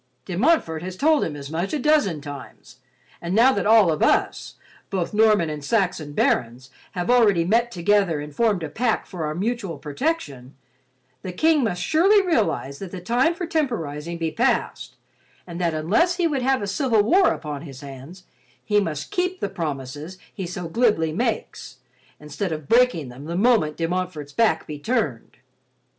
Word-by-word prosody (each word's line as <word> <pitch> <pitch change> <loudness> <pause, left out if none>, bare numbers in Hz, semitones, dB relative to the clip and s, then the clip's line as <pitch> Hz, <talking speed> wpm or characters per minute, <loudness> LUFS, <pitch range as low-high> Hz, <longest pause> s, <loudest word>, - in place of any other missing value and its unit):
"De 185 - -5
Montfort 190 - +2
has 185 +1 -7
told 310 +3 +3
him 150 - -3
as 140 0 -8
much 170 - -2
a - - +1
dozen 270 - +2
times, 145 -2 -10 0.4
and 175 +2 -2
now 250 +4 +6
that 200 0 -1
all 215 -6 +6
of 155 - -2
us, - - +1 0.3
both 190 -2 -2
Norman 210 -5 +4
and 150 -2 -5
Saxon 175 -6 -1
barons, 125 0 0 0.2
have 180 +4 -1
already 205 -9 +4
met 230 +6 +2
together 190 -3 +1
and 150 0 -8
formed 215 -7 +1
a - - -2
pact 225 +7 -1
for 170 -5 -4
our 150 - -4
mutual 200 -3 -3
protection, 145 - -4 0.7
the 185 - -5
King 310 - +2
must 180 -6 -1
surely 355 +7 +4
realize 215 - 0
that 195 - -7
the 185 - -7
time 245 - +1
for 350 - -4
temporizing 170 - -2
be 165 -1 -2
past, 240 +10 -1 0.5
and 175 0 -7
that 170 -2 0
unless 220 - +2
he 350 -1 0
would 290 -5 0
have 260 -2 +1
a - - -3
civil 225 0 +2
war 360 - +4
upon 150 -3 -5
his 135 -4 -10
hands, 140 +6 -11 0.4
he 210 -2 +3
must 155 -6 -4
keep 365 +1 -1
the 200 - -2
promises 150 +1 -5 0.2
he 190 -3 -5
so 180 -1 -5
glibly 185 -5 +1
makes, 220 - -3 0.4
instead 150 +5 -4
of 155 -3 -5
breaking 235 - +3
them 130 +4 -11
the 170 +2 -4
moment 205 -9 +2
De 165 - -1
Montfort's 170 -5 -4
back 215 -6 +2
be 150 -1 -7
turned." 175 - -2
185 Hz, 180 wpm, -23 LUFS, 155-235 Hz, 0.7 s, now